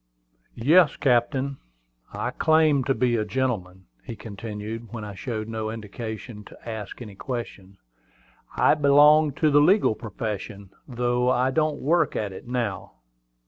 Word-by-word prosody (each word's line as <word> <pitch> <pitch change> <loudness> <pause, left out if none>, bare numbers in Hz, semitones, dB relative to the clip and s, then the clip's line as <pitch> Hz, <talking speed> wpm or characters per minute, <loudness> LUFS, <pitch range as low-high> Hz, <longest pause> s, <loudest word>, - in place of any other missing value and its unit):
"Yes, 150 +7 +4
captain: 135 +2 +1 0.5
I - - -3
claim 155 -3 +3
to 135 - +1
be 120 -2 +1
a 110 - 0
gentleman," 105 -6 -3 0.2
he 115 - -7
continued, 110 +1 -7
when 115 -2 -6
I 105 - -7
showed 110 +3 -5
no 110 -1 -4
inclination 110 +1 -7
to - - -15
ask 110 +1 -6
any 105 -3 -10
questions. 100 -4 -7 0.8
"I - - +5
belong 150 +1 +5
to 150 +1 +1
the 145 +1 +6
legal 190 - +4
profession, 105 -3 -6 0.2
though 125 0 0
I 130 +1 +2
don't 155 0 0
work 165 +2 +2
at 105 -3 -3
it 95 - -11
now." 120 -6 -3
120 Hz, 140 wpm, -25 LUFS, 105-140 Hz, 0.8 s, the